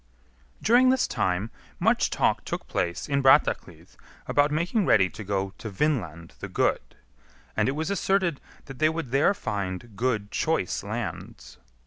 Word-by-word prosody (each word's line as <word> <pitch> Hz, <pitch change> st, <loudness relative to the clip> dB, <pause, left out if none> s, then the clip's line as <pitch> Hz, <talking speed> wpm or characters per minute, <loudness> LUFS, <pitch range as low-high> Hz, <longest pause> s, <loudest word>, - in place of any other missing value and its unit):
During 245 Hz, +4 st, +5 dB
this 260 Hz, -1 st, +3 dB
time 95 Hz, +4 st, -1 dB, 0.3 s
much -, -, +2 dB
talk -, -, +1 dB
took -, -, -5 dB
place 85 Hz, -1 st, -2 dB
in 140 Hz, -1 st, +1 dB
Brattahlid 135 Hz, 0 st, +2 dB, 0.3 s
about 145 Hz, 0 st, +2 dB
making 175 Hz, +8 st, 0 dB
ready 95 Hz, -4 st, +4 dB
to 110 Hz, -, -8 dB
go 95 Hz, -1 st, -2 dB
to 110 Hz, -, -6 dB
Vinland 95 Hz, -, -2 dB
the -, -, -5 dB
Good, -, -, -1 dB, 0.6 s
and -, -, +2 dB
it -, -, -1 dB
was 160 Hz, +5 st, -2 dB
asserted 190 Hz, -5 st, 0 dB, 0.2 s
that 135 Hz, -1 st, -10 dB
they 155 Hz, 0 st, +4 dB
would 160 Hz, -6 st, -4 dB
there 140 Hz, +9 st, +3 dB
find 100 Hz, -, -4 dB
good 105 Hz, -2 st, -1 dB
choice 160 Hz, -, -1 dB
lands. 100 Hz, -, -6 dB
120 Hz, 150 wpm, -26 LUFS, 95-155 Hz, 0.6 s, During